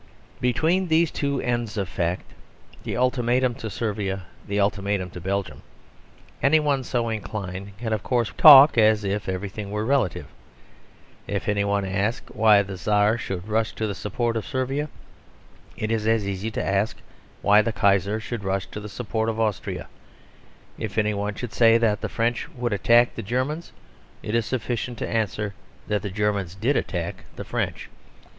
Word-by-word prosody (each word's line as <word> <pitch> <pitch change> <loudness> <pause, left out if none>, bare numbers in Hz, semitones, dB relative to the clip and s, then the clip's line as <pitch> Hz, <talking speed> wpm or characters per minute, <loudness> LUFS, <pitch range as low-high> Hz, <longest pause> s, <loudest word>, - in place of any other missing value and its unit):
Between 160 +10 +2
these 160 0 +3
two 140 -1 -1
ends 120 -3 -2
of 100 -2 -1
fact, 90 +1 -3 0.5
the - - -3
ultimatum 125 0 +2
to 115 -1 -6
Servia, 100 -1 -3 0.2
the 100 0 -1
ultimatum 100 -2 0
to 90 - -8
Belgium, 100 0 -3 0.8
any 155 +3 +5
one 145 -3 0
so 120 -2 -1
inclined 100 -3 -5
can 110 0 -2
of 110 - -1
course 120 -3 0
talk 140 -4 +9
as 110 -1 +4
if 100 0 -2
everything 100 +2 -4
were 105 +1 -2
relative. 110 - +1 1.0
If 100 0 -3
any 105 -1 +1
one 100 -1 0
ask 100 +4 -1
why 105 -2 +5
the 95 -1 -7
Czar 105 +4 +2
should 95 -4 -5
rush 110 +1 0
to 110 - -3
the 105 - -2
support 115 +4 -2
of 110 - -3
Servia, 135 +2 -2 0.9
it 110 +1 -2
is 110 -1 0
as 110 -3 +2
easy 100 +2 -3
to 110 - -3
ask 100 +2 0 0.5
why 105 +1 +6
the 115 - -1
Kaiser 100 0 +2
should 110 -1 -5
rush 95 0 -1
to - - -6
the 105 0 -8
support 110 0 -2
of 110 0 -3
Austria. 110 -4 -2 0.9
If 110 -1 -5
any 105 -1 +2
one 100 0 -3 0.2
say 115 -1 +5
that 110 -3 +1
the - - -3
French 115 +1 -1
would 120 -3 -1
attack 120 +4 +4
the - - -5
Germans, 130 - -2 0.5
it 105 - -4
is 115 -1 +1
sufficient 120 -1 -3
to - - -3
answer 105 -2 -1 0.3
that 105 -1 0
the 100 - -4
Germans 100 -3 -1
did 120 +9 +1
attack 85 -7 -3
the - - -6
French. - - -3
110 Hz, 170 wpm, -24 LUFS, 100-120 Hz, 1.0 s, talk